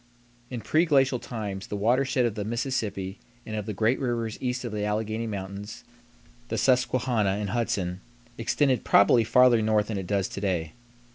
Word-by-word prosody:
In 125 Hz, -3 st, -5 dB
preglacial 135 Hz, -, +2 dB
times 100 Hz, -5 st, -5 dB
the -, -, -4 dB
watershed 125 Hz, +5 st, +2 dB
of 115 Hz, -, 0 dB
the 105 Hz, -1 st, -4 dB
Mississippi 110 Hz, -4 st, -3 dB, 0.3 s
and 110 Hz, -, -5 dB
of 105 Hz, 0 st, -4 dB
the 110 Hz, -, -2 dB
great 110 Hz, +5 st, +2 dB
rivers 120 Hz, -4 st, -2 dB
east 125 Hz, 0 st, -2 dB
of 120 Hz, -, -4 dB
the 105 Hz, -1 st, -3 dB
Alleghany 110 Hz, +2 st, -2 dB
Mountains, 100 Hz, 0 st, -6 dB, 0.6 s
the 115 Hz, -, -3 dB
Susquehanna 120 Hz, -4 st, +2 dB
and 100 Hz, -2 st, -3 dB
Hudson, 95 Hz, -6 st, -1 dB, 0.3 s
extended 130 Hz, +2 st, +1 dB
probably 115 Hz, +3 st, +5 dB
farther 120 Hz, +1 st, +5 dB
north 110 Hz, -1 st, +1 dB
than 105 Hz, -3 st, -2 dB
it 95 Hz, -, -6 dB
does 100 Hz, -1 st, 0 dB
to 100 Hz, -, -6 dB
day. 85 Hz, -6 st, -1 dB
110 Hz, 165 wpm, -26 LUFS, 100-125 Hz, 0.6 s, probably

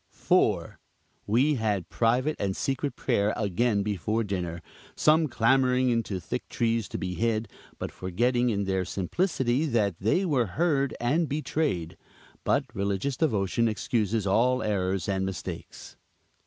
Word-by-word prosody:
4. -, -, +1 dB, 0.5 s
We 125 Hz, +8 st, +3 dB
had 105 Hz, -5 st, -1 dB
private 125 Hz, +6 st, +1 dB
and 95 Hz, -1 st, -1 dB
secret 135 Hz, +1 st, -2 dB
prayer 105 Hz, -4 st, +1 dB
again 105 Hz, +1 st, +1 dB
before 105 Hz, +3 st, -1 dB
dinner; 90 Hz, -4 st, -4 dB, 0.3 s
some 155 Hz, +1 st, +4 dB
clambering 125 Hz, +1 st, +3 dB
into 110 Hz, -5 st, -1 dB
thick -, -, -5 dB
trees 115 Hz, -2 st, 0 dB
to -, -, -4 dB
be 90 Hz, -1 st, -3 dB
hid, 110 Hz, +2 st, 0 dB, 0.3 s
but -, -, -5 dB
forgetting 120 Hz, +7 st, 0 dB
in 100 Hz, -3 st, 0 dB
their 95 Hz, -1 st, 0 dB
simplicity, 130 Hz, -, 0 dB
that 105 Hz, -, 0 dB
they 115 Hz, -, +2 dB
were 135 Hz, -, +1 dB
heard 145 Hz, -5 st, +1 dB
and 145 Hz, +7 st, +1 dB
betrayed. 145 Hz, -, -2 dB, 0.5 s
But -, -, +2 dB
religious 100 Hz, +7 st, -1 dB
devotion 115 Hz, -, +1 dB
excuses 110 Hz, -1 st, 0 dB
all 125 Hz, +6 st, +2 dB
errors 95 Hz, -4 st, -1 dB
and 95 Hz, -1 st, 0 dB
mistakes. 95 Hz, -3 st, -6 dB
115 Hz, 135 wpm, -27 LUFS, 100-130 Hz, 0.5 s, some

